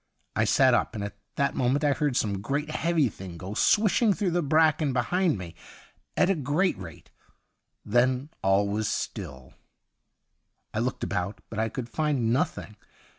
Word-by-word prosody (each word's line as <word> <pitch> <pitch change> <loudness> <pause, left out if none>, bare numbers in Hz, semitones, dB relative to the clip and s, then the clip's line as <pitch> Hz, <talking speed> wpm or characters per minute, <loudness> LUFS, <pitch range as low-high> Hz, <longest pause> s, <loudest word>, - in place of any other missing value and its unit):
I 110 - +2
sat 130 +4 +4
up, 120 - +1
and 105 - -3
at 100 0 -6 0.2
that 140 - +1
moment 130 +4 +1
I 145 -1 +3
heard 145 -3 0
some 100 -3 -1
great, 145 +7 -2
heavy 160 -3 +1
thing 95 -5 -8
go 95 +4 -6
swishing 215 - +3
through 190 -2 -1
the 175 +1 +1
bracken 155 -1 +3
behind 160 - +1
me 85 -3 -8 0.6
at - - +4
a 195 - +3
great 160 +4 0
rate. 85 -5 -11 0.7
Then 125 +5 +2
all 95 +1 +3
was 105 +1 -1
still; 75 - -5 1.2
I - - -1
looked - - -2
about, 90 +4 -3
but 110 - -4
I 110 0 +1
could 120 +1 -5
find 135 -4 0
nothing. 110 -4 -2
125 Hz, 165 wpm, -27 LUFS, 100-155 Hz, 1.2 s, sat